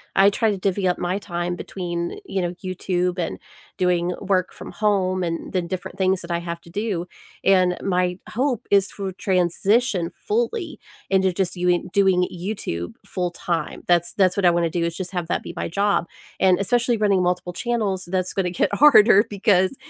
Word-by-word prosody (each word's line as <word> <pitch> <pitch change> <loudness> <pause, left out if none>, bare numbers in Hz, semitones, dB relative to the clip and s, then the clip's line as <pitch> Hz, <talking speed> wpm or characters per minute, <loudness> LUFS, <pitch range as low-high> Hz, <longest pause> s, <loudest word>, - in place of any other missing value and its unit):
I 195 +1 +6
try 220 +1 +1
to 200 - -2
divvy 190 0 0
up 180 - +1
my 180 +2 -1
time 175 -2 -3
between, 175 - -4
you 195 - -2
know, 175 0 -2
YouTube 180 -1 -1
and 165 - -3 0.4
doing 180 -1 +1
work 185 -2 0
from - - -9
home, 190 -3 +1
and 165 -1 -4
the 185 - +1
different 180 +2 -6
things 190 -1 +2
that 170 0 -7
I 170 - 0
have 170 0 -5
to 170 - -16
do, 200 -3 -2 0.4
and 185 -2 +4
my 180 -2 0
hope 250 -1 -1
is 200 -1 +4
to 195 -2 -5
transition 185 +1 +1
fully 435 -7 -2 0.3
into 190 -1 +3
just 185 0 -1
youing 180 0 0
doing 190 -2 +3
YouTube 170 - -4
full 180 -1 -2
time. 175 -1 -3
That's 175 -1 +2
that's 185 -2 +3
what 200 - +1
I 175 - +8
wanna 170 -1 +1
do, 170 0 -1
is 170 0 -2
just 185 -1 -5
have 175 -3 -3
that - - -1
be - - -7
my - - -3
job. 200 0 +1 0.3
And 185 -2 +4
especially 235 +3 +1
running 200 -3 +2
multiple 180 0 -1
channels, 205 -3 -1
that's 185 0 -2
gonna 185 -2 0
get 175 - 0
harder 230 -7 +7
because, 200 +1 +2
185 Hz, 185 wpm, -22 LUFS, 175-200 Hz, 0.4 s, I